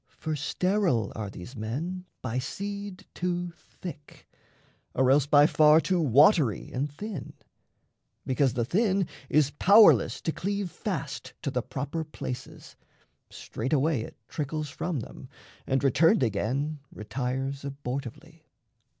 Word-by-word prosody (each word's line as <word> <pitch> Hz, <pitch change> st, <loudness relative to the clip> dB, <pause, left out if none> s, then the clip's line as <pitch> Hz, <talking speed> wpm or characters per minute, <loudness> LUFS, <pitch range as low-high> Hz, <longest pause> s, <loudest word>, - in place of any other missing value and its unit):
For 155 Hz, -1 st, -3 dB
sterile 170 Hz, -, 0 dB
are 105 Hz, -2 st, -4 dB
these 95 Hz, +7 st, -10 dB
men 155 Hz, +12 st, -4 dB, 0.2 s
by 125 Hz, 0 st, -1 dB
seed 200 Hz, +7 st, -5 dB
too 175 Hz, -1 st, -2 dB
thick, 150 Hz, -5 st, -11 dB, 0.7 s
Or 130 Hz, 0 st, +4 dB
else 140 Hz, 0 st, +4 dB
by 145 Hz, 0 st, +6 dB
far 155 Hz, 0 st, +6 dB
too 180 Hz, +1 st, +1 dB
watery 145 Hz, -, +4 dB
and 140 Hz, +3 st, -2 dB
thin. 190 Hz, -, -7 dB, 0.9 s
Because 130 Hz, -1 st, +2 dB
the 120 Hz, -1 st, 0 dB
thin 195 Hz, -, +2 dB, 0.2 s
is 145 Hz, -2 st, +3 dB
powerless 205 Hz, +8 st, +6 dB
to 160 Hz, -, -1 dB
cleave 200 Hz, +1 st, -3 dB
Fast -, -, -5 dB
to -, -, -1 dB
the -, -, 0 dB
proper 145 Hz, +5 st, -4 dB
places, 130 Hz, -4 st, -8 dB, 0.5 s
straightaway 145 Hz, -1 st, -1 dB
It -, -, -9 dB
trickles 150 Hz, 0 st, -3 dB
from 155 Hz, -1 st, -3 dB
them, -, -, -10 dB, 0.4 s
and, 135 Hz, +1 st, +1 dB
returned 155 Hz, -, +4 dB
again, 130 Hz, +8 st, -1 dB
Retires 130 Hz, +5 st, -3 dB
abortively. 140 Hz, +3 st, -6 dB
145 Hz, 125 wpm, -28 LUFS, 130-175 Hz, 0.9 s, by